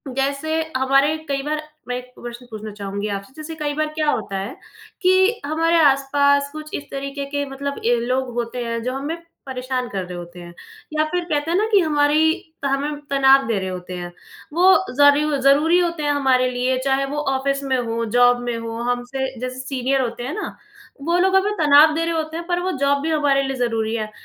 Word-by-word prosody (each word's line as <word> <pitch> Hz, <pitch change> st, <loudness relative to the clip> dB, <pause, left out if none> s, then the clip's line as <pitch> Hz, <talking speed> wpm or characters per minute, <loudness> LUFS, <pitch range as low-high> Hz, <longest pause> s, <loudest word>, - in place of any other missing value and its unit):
जैसे 280 Hz, +4 st, 0 dB, 0.2 s
हमारे 275 Hz, +3 st, +3 dB
कई 275 Hz, -1 st, -1 dB
बार 305 Hz, +1 st, -2 dB, 0.3 s
मैं 245 Hz, -, -2 dB
एक 250 Hz, 0 st, -10 dB
प्रश्न 240 Hz, +1 st, -8 dB
पूछना 215 Hz, -1 st, -7 dB
चाहूँगी 200 Hz, 0 st, -4 dB
आपसे। 200 Hz, +4 st, -5 dB
जैसे 315 Hz, +1 st, -7 dB
कई 295 Hz, -1 st, -2 dB
बार 310 Hz, +1 st, 0 dB
क्या 305 Hz, -1 st, +1 dB
होता 200 Hz, -6 st, -2 dB
है 200 Hz, +7 st, -5 dB, 0.5 s
कि 375 Hz, +4 st, +3 dB
हमारे 330 Hz, +3 st, +2 dB
आस-पास 280 Hz, +1 st, +3 dB
कुछ 305 Hz, 0 st, -9 dB
इस 290 Hz, -, -8 dB
तरीके 275 Hz, +1 st, -4 dB
के 285 Hz, 0 st, -2 dB
मतलब 280 Hz, +1 st, -4 dB
ए, 240 Hz, +1 st, +4 dB
लोग 255 Hz, +1 st, -1 dB
होते 240 Hz, +1 st, -3 dB
हैं, 230 Hz, 0 st, -2 dB
जो 255 Hz, +1 st, -2 dB
हमें 290 Hz, +5 st, -3 dB, 0.3 s
परेशान 255 Hz, -1 st, -3 dB
कर 195 Hz, -2 st, -3 dB
रहे 180 Hz, 0 st, -7 dB
होते 175 Hz, 0 st, -9 dB
हैं, 175 Hz, 0 st, -10 dB, 0.4 s
या 310 Hz, -, +4 dB
फिर 355 Hz, -1 st, 0 dB
कहते 295 Hz, +2 st, 0 dB
हैं 350 Hz, -, +2 dB
ना 425 Hz, -, +2 dB
कि 405 Hz, -, +6 dB
हमारी 310 Hz, -1 st, +3 dB, 0.3 s
त -, -, -1 dB
हमें 280 Hz, +2 st, 0 dB
तनाव 270 Hz, -1 st, +5 dB
दे 225 Hz, -3 st, 0 dB
रहे 190 Hz, 0 st, -3 dB
होते 180 Hz, 0 st, -6 dB
हैं। 175 Hz, 0 st, -6 dB, 0.4 s
वो 365 Hz, +3 st, +6 dB, 0.2 s
ज़रू 290 Hz, +1 st, +5 dB
ज़रूरी 295 Hz, +6 st, +4 dB
होते 340 Hz, -3 st, -1 dB
हैं 290 Hz, -, +2 dB
हमारे 260 Hz, -3 st, +2 dB
लिए, 250 Hz, +1 st, 0 dB
चाहे 270 Hz, 0 st, +2 dB
वो 290 Hz, +2 st, -5 dB, 0.2 s
ऑफ़िस 275 Hz, +1 st, -1 dB
में 265 Hz, -1 st, 0 dB
हो, 230 Hz, -1 st, -2 dB
जॉब 245 Hz, +2 st, +4 dB
में 240 Hz, -1 st, -3 dB
हो, 230 Hz, 0 st, -5 dB
हमसे 245 Hz, +2 st, -3 dB
जैसे 255 Hz, +1 st, -5 dB
सीनियर 265 Hz, 0 st, -1 dB
होते 240 Hz, -1 st, -3 dB
हैं 270 Hz, -, -4 dB
ना, 425 Hz, -, -5 dB, 0.5 s
वो 335 Hz, +4 st, +1 dB
लोग 380 Hz, +1 st, +3 dB
हमें 390 Hz, +2 st, +3 dB
तनाव 300 Hz, 0 st, +6 dB
दे 330 Hz, -, 0 dB
रहे 335 Hz, -, -1 dB
होते 320 Hz, 0 st, -3 dB
हैं, 340 Hz, -, -6 dB
पर 350 Hz, 0 st, 0 dB
वो 370 Hz, +1 st, -1 dB
जॉब 280 Hz, 0 st, +2 dB
भी 320 Hz, -, -1 dB
हमारे 285 Hz, -3 st, +2 dB
लिए 270 Hz, 0 st, -2 dB
ज़रूरी 225 Hz, -2 st, -1 dB
है। 215 Hz, -1 st, -3 dB
275 Hz, 215 wpm, -21 LUFS, 245-305 Hz, 0.5 s, कि